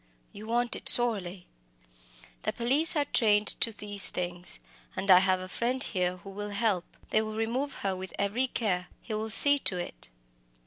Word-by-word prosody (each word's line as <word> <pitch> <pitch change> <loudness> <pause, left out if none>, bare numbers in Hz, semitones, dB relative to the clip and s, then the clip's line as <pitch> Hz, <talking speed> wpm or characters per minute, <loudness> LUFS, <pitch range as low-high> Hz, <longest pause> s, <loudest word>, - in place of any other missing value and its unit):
you 215 +2 -10
want 240 +1 0
it - - +4
sorely. 195 -7 +2 1.0
The - - -1
police 275 +8 +3
are 295 -2 +1
trained 210 -5 +2
to 230 - +1
these 205 -2 -3
things, 175 0 -5 0.4
and 190 +1 +1
I 180 - +9
have 185 0 +2
a 185 - -7
friend 250 +7 -2
here 180 -2 -1
who 195 +2 -11
will 205 +1 -6
help. 200 -3 -2
They 215 - +3
will 215 0 -5
remove 245 +6 -2
her 190 -1 0
with 185 0 -7
every 215 +6 0
care 185 -8 -1 0.2
he 225 - -6
will 215 +1 -3
see 285 +6 +6
to 185 - -1
it." - - -7
210 Hz, 180 wpm, -29 LUFS, 185-235 Hz, 1.0 s, I